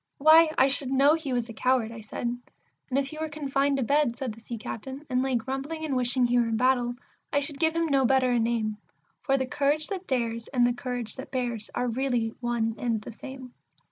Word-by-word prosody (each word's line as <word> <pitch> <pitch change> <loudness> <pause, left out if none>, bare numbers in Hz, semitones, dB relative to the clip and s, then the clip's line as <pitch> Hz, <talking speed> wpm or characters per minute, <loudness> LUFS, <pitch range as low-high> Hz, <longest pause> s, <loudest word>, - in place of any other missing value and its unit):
Why, 315 +2 +7
I 260 - +6
should 270 -1 0
know 275 +3 +5
he 315 -4 -2
was 245 -2 0
a 230 - -8
coward," 250 -1 +1
I 230 -1 -8
said. 215 +2 -6 0.6
"And 260 - 0
if 275 0 0
he 310 - -8
were 315 0 -2
confined 280 -2 0
to 265 - 0
bed," 280 -1 +2
said 260 -5 -3
the 225 - -15
Sea 235 +1 -6
captain, 265 +6 -7
"and 250 0 +2
lay 265 -1 0
grumbling 270 +7 -3
and 280 -4 -1
wishing 250 0 +3
he 245 0 +3
were 235 - +2
in 225 -1 0
battle, 245 0 +2 0.4
I 285 - +3
should 285 0 -4
give 320 0 +2
him 335 0 +2
no 275 -4 +2
better 260 0 +3
a 240 - +2
name; 225 -2 0 0.4
For 270 -1 +2
the 260 - 0
courage 290 +4 0
that 380 -2 -5
dares, 230 -3 -1
and 245 -3 +2
the 245 - +2
courage 245 -2 -4
that 265 - -7
bears, 240 -4 -3
are 250 - 0
really 245 -1 0
one 235 -2 0
and 230 -3 0
the 210 - -9
same." 255 +2 -10
255 Hz, 235 wpm, -27 LUFS, 240-275 Hz, 0.6 s, Why